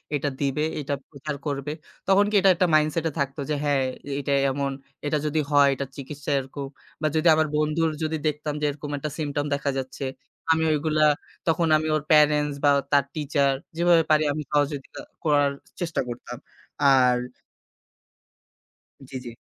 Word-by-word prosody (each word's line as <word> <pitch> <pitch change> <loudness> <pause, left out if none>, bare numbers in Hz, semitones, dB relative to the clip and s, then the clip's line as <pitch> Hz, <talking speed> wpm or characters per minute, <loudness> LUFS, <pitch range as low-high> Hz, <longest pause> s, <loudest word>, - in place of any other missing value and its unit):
এটা 145 0 -1
দিবে, 140 +2 0 0.2
এটা 145 0 -3 0.2
প্রচার 150 +1 -6
করবে। 145 0 -3 0.4
তখন 195 +1 +5
কি 215 - -2
এটা 195 - +5
একটা 180 +1 +2
মাইন্ডসেট 155 +2 +2
এ - - -8
থাকতো 140 +1 -2
যে 150 - +1
হ্যাঁ 145 -2 +2 0.3
এ - - -4
এইটা 140 0 -1 0.2
এমন, 140 0 -2 0.3
এটা 150 +1 +1
যদি 150 +1 0
হয় 145 -1 +6
এটা 140 - -3
চিকিৎসা 145 +1 -6
এরকম। 135 +1 -6 0.3
বা 155 - +2
যদি 160 +2 +2
আমার 155 0 +2
বন্ধুর 155 +2 +1
যদি 160 0 -1
দেখতাম 150 0 -2
যে - - +1
এরকম 145 +1 -6
একটা 150 +2 -4
symptom 145 -2 -2
দেখা 140 0 -1
যাচ্ছে। 135 +1 -4 0.5
আমি 160 0 +3
ঐগুলা 155 0 +1 0.4
তখন 165 0 +2
আমি 155 +1 -2
ওর 155 - 0
প্যারেন্টস 150 -1 +4
বা 145 - +6 0.2
তার 140 -1 +5
টিচার 140 -2 +1 0.2
যেভাবে 170 -1 +5
পারি 155 0 +5
আমি 150 - -4
সহযোগিতা 145 -1 -1 0.2
করার 145 -3 +3 0.3
চেষ্টা 170 -3 -1
করতাম। 120 0 -7 0.5
আর 125 -2 +5 1.9
জি, - - -10
জি। - - -5
150 Hz, 165 wpm, -25 LUFS, 140-155 Hz, 1.9 s, হয়